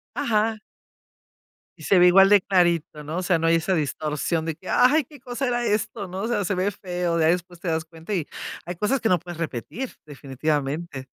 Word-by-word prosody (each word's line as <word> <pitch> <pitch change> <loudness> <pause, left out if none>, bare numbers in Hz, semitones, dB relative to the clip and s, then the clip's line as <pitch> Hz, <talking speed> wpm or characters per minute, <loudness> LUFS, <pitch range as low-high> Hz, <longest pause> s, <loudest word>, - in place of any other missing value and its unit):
Ajá. 225 -4 +1 1.2
Y - - -14
se 195 - +3
ve 180 - +7
igual 195 +2 +7
de 205 -1 +6
clarito, 170 -5 +1
¿no? 155 +3 -5
O - - -2
sea, 180 -2 +2
no 165 0 +1
hay 165 - +5
esa 185 +3 0
distorsión 155 +2 -1
de 165 -1 -2
que: 185 - -13
"Ay, 290 +5 +4
¿qué 290 +3 -15
cosa 250 +2 -3
era 240 0 0
esto", 210 -1 -1
no? 185 +2 -5
O 225 - -2
sea, 210 -4 0
se 195 - 0
ve 185 +2 0
feo, 180 -3 -2
ya 160 - +3
después 175 +1 0
te 185 - -4
das 160 0 0
cuenta 165 +4 -7
y 170 -6 -2 0.4
hay 175 +1 -6
cosas 245 +9 0
que 225 - +1
no 180 -3 +3
puedes 175 0 -9
repetir, 165 - -4 0.2
definitivamente. 145 +1 -3
175 Hz, 215 wpm, -24 LUFS, 160-205 Hz, 1.2 s, ve